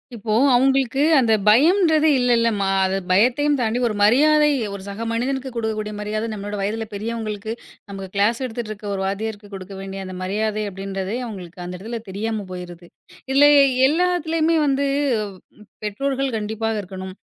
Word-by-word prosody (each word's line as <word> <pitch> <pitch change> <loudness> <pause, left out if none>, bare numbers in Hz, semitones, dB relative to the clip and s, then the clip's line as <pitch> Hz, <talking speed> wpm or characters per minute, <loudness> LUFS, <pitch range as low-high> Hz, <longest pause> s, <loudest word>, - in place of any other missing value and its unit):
இப்போது 220 +4 +1
அவங்களுக்கு 265 +1 +2
அந்தப் 220 -6 +3
பயம் 295 - +5
என்கிறது 315 -2 +3
இல்லை, 245 -1 +3
இல்லை, 230 0 +3
அம்மா 200 -1 -1 0.2
அது 190 0 0 0.2
பயத்தையும் 255 +9 +3
தாண்டி 235 0 0
ஒரு 215 - -3
மரியாதை. 300 +8 +5 0.2
ஒரு 200 - -7
சக 200 +3 -5
மனிதனுக்கு 265 +3 -2
கொடுக்கக்கூடிய 215 -2 -3
மரியாதை, 215 +1 -3
நம்மளோட 205 0 -5
வயதில் 215 +2 -3
பெரியவங்களுக்கு 220 0 -4 0.4
நமக்கு 195 -1 -7
க்ளாஸ் 220 +5 +2
எடுத்துட்டு 230 -2 -5
இருக்க 210 0 -9
ஒரு 190 - -3
வாத்தியருக்கு 205 +1 -4
கொடுக்க 190 0 -8
வேண்டிய 195 0 -6
அந்த 185 0 -7
மரியாதை 215 +3 -1
அப்படி 195 0 -9
என்றதே 195 +2 -3
அவங்களுக்கு 180 -5 -9
அந்த 180 - -6
இடத்தில் 225 +3 -7
தெரியாமல் 210 0 -4
போயிருக்கு. 175 -1 -9 0.4
இதில் 275 +2 +6
எ 285 -1 +7 0.2
எல்லாத்திலுமே 330 0 +1
வந்து 280 0 +1 1.0
பெற்றோர்கள் 270 +4 -2
கண்டிப்பாக 220 0 -2
இருக்க 190 0 -11
வேண்டும். 185 0 -7
220 Hz, 160 wpm, -21 LUFS, 200-265 Hz, 1.0 s, எ